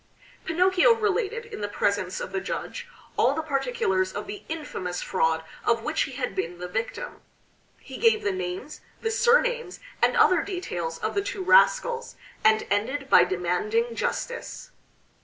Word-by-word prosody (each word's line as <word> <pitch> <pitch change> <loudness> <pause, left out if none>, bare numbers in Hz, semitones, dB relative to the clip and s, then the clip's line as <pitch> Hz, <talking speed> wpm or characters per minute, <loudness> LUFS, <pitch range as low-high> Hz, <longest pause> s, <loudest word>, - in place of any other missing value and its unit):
Pinocchio 370 +6 +4
related 450 +2 -1
in 455 - -8
the 205 - -1
presence 200 -2 -1
of - - -5
the 190 0 -2
judge 195 - -5 0.3
all 275 - +3
the 320 - -2
particulars 250 -10 0
of - - -4
the 405 0 -7
infamous 195 - -4
fraud 160 -3 +1 0.2
of 230 -1 +1
which 305 +4 -1
he 270 - -1
had 255 0 -3
been 175 -1 -3
the 180 0 -6
victim. 225 - -4 0.6
He - - -10
gave 450 -2 +4
the 200 - +1
names, 185 +9 -5 0.2
the 450 - 0
surnames, 475 -3 +2 0.2
and - - +3
other 370 -7 +5
details, 175 - -4
of - - -3
the 400 - +1
two 390 -1 -4
rascals, 480 +2 +3 0.3
and 220 0 +4
ended 265 +7 -1
by - - +8
demanding 200 +6 0
justice. 485 - -4
275 Hz, 160 wpm, -26 LUFS, -, 0.6 s, by